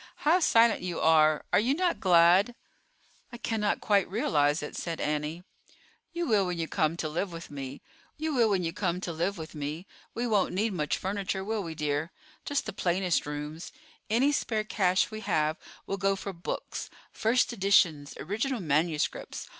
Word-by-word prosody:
How 335 +5 +5
silent 230 - +4
you 180 -2 -3
are; 155 -1 +4
are - - +6
you 250 +6 +2
not 355 +1 0
glad?" 180 +5 +5 0.8
"I 240 - -8
cannot 220 -3 -1
quite 200 -4 +2
realize 150 -7 +1
it," 150 - -6
said 165 -2 -4
Annie. 150 +3 -2 0.7
"You 345 0 -2
will 205 -4 +3
when 180 -1 -2
you 165 -1 -2
come 160 -2 0
to 160 - -2
live 175 +5 -2
with 165 -2 -9
me. 135 -1 -7 0.4
We 315 - -2
won't 215 -8 +2
need 165 -1 -4 1.9
much 150 -5 -1
furniture, 195 0 -2
will 215 +1 -2
we, 165 -4 -6
dear? 150 +2 -1 0.3
Just 285 -1 -1
the - - -5
plainest 180 -3 0
rooms. 150 +3 -6 0.4
Any 250 +7 +3
spare 220 -6 0
cash 190 -1 +1
we 215 - -5
have 155 -5 0 0.3
will 195 - -3
go 195 +1 +1
for 195 0 -6
books—first 225 +7 -2
editions, 185 -8 +2
original 225 - -2
manuscripts. 155 -2 -1
185 Hz, 145 wpm, -29 LUFS, 160-215 Hz, 1.9 s, are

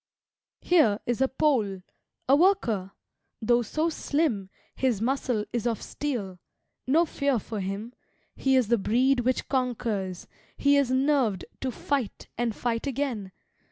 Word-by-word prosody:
Here 255 -13 +4
is 240 +1 -1
a 265 - +5
Pole 230 -10 +1 0.4
a 270 - +6
worker; 235 - +2 0.5
though 240 +2 +3
so 310 +8 0
slim 285 - -1 0.3
His 250 -6 +1
muscle 245 -2 0
is 240 -1 0
of 230 -2 -1
steel 215 -11 -4 0.5
no 320 +6 +4
fear 280 -4 0
for 220 0 -5
him; 200 +5 -4 0.4
He 265 0 +2
is 250 -5 +3
the 235 -2 +3
breed 250 +6 +2
which 250 +1 0
conquers; 225 -8 -2 0.3
he 285 0 +4
is 280 -3 +3
nerved 260 -7 +2
To 265 - -2
fight 265 -2 -3
and 235 -2 -1
fight 235 +2 -2
again. 250 -8 -2
245 Hz, 140 wpm, -27 LUFS, 215-275 Hz, 0.5 s, a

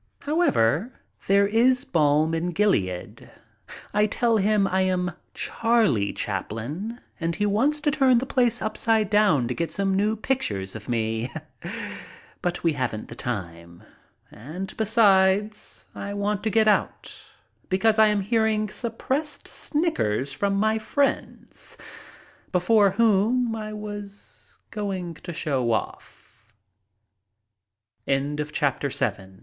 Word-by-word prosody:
However, 260 - +2 0.3
there 200 +1 +5
is 240 +5 +3
balm 155 0 +2
in 170 +2 -1
Gilead. 100 - -1 0.6
I 210 +1 +3
tell 230 +2 +1
him 210 0 +3
I 190 0 +1
am 180 -1 0 0.2
Charlie 220 - +1
Chaplin 125 - -4 0.2
and 165 -1 -1
he 205 - 0
wants 255 +9 +2
to 295 - +2
turn 265 -4 +4
the 250 - 0
place 245 -3 +1
upside 215 -1 +1
down 200 - +4
to 125 - -2
get 165 +3 -3
some 195 +3 0
new 210 +3 +2
pictures 105 - -2
of 110 +1 -9
me; 115 0 -1 1.1
but 175 0 -2
we 165 -2 +3
haven't 125 -6 -3
the 115 - -8
time, 85 -8 -6 0.5
and, 155 - -7
besides, 210 -1 +2
I 200 0 -5
want 205 0 -1
to - - +2
get 220 0 +3
out, 210 - 0 0.5
because 215 +4 +2
I 220 - +7
am 210 -1 +1
hear 220 +3 +2
ing 215 -1 0
suppressed 260 +7 -3
snickers 140 - -1
from 200 -1 0
my 220 +2 +2
friends, 275 +6 -2 0.7
before 200 +3 +4
whom 225 +3 +2
I 215 -1 -5
was 205 -1 -7
going 190 -5 -3
to 175 - -6
show 145 -5 -1
200 Hz, 120 wpm, -25 LUFS, 160-220 Hz, 1.1 s, I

